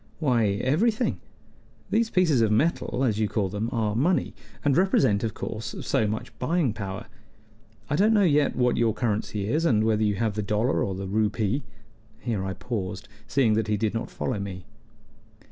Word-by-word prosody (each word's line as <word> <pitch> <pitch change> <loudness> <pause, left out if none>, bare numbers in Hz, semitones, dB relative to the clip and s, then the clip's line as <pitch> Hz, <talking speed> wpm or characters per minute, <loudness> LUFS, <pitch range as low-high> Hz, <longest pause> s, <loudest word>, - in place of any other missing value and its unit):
"Why, 125 -8 +2 0.2
everything. 215 - +1 0.7
These 225 +1 +2
pieces 165 - +3
of 110 -2 +3
metal, 130 0 +1
as 110 -5 +1
you 110 - +2
call 100 -2 -1
them, 105 +4 -2
are 110 -2 0
money, 165 +10 +1 0.3
and 140 -2 +3
represent, 135 - +3
of 110 -2 -2
course, 110 +1 -5
so 110 - +1
much 110 +1 -4
buying 150 -3 +1
power. 100 -2 -5 0.8
I 145 - 0
don't 210 +5 +4
know 205 - +4
yet 150 -5 +3
what 125 -1 +2
your 115 -2 +2
currency 105 -3 -2
is, 155 +9 +1
and 110 -10 +3
whether 110 -1 +2
you 105 -1 +1
have 110 +1 0
the 105 - -2
dollar 105 +5 +1
or 95 - -2
the 95 +1 -5
rupee" 105 +4 0 0.6
here 110 -6 -2
I 95 0 -3
paused, 95 0 -5 0.2
seeing 125 -5 +3
that 110 -1 0
he 105 -1 +1
did 105 0 0
not 115 +1 -3
follow 115 -6 -3
me. 95 -2 -6
110 Hz, 180 wpm, -26 LUFS, 105-135 Hz, 0.8 s, don't